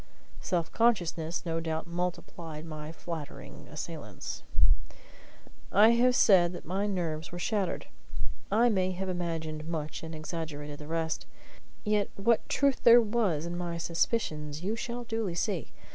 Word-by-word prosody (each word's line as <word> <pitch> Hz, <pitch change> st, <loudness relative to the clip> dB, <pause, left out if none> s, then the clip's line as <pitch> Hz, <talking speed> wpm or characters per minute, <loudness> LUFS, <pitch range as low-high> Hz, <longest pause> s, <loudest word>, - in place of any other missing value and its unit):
Self 170 Hz, -3 st, -1 dB
consciousness 175 Hz, -8 st, +1 dB
no 165 Hz, -1 st, 0 dB
doubt 160 Hz, -1 st, -2 dB
multiplied 170 Hz, -2 st, -4 dB
my 155 Hz, -1 st, -6 dB
flattering 165 Hz, -2 st, -7 dB
assailants. -, -, -6 dB, 1.3 s
I 210 Hz, +3 st, +7 dB
have 245 Hz, +2 st, +5 dB
said 180 Hz, -6 st, +6 dB
that 175 Hz, -, -8 dB
my 195 Hz, +5 st, 0 dB
nerves 165 Hz, -5 st, -2 dB
were 175 Hz, -, -5 dB
shattered. 195 Hz, 0 st, -1 dB, 0.7 s
I 225 Hz, +4 st, +5 dB
may 185 Hz, -5 st, +2 dB
have 190 Hz, +1 st, -3 dB
imagined 165 Hz, -3 st, -3 dB
much 155 Hz, -2 st, -3 dB
and 160 Hz, 0 st, -6 dB
exaggerated 155 Hz, -2 st, -5 dB
the 150 Hz, -, -8 dB
rest. 160 Hz, 0 st, -1 dB, 0.6 s
Yet 210 Hz, -1 st, +2 dB
what 225 Hz, +3 st, +2 dB
truth 280 Hz, -1 st, +2 dB
there 235 Hz, 0 st, +10 dB
was 210 Hz, -9 st, +1 dB
in 170 Hz, 0 st, -3 dB
my 175 Hz, -1 st, -3 dB
suspicions 165 Hz, -3 st, -1 dB
you 210 Hz, +4 st, 0 dB
shall 240 Hz, +1 st, -4 dB
duly 225 Hz, -6 st, -2 dB
see. 175 Hz, -, -1 dB
175 Hz, 140 wpm, -30 LUFS, 160-210 Hz, 1.3 s, there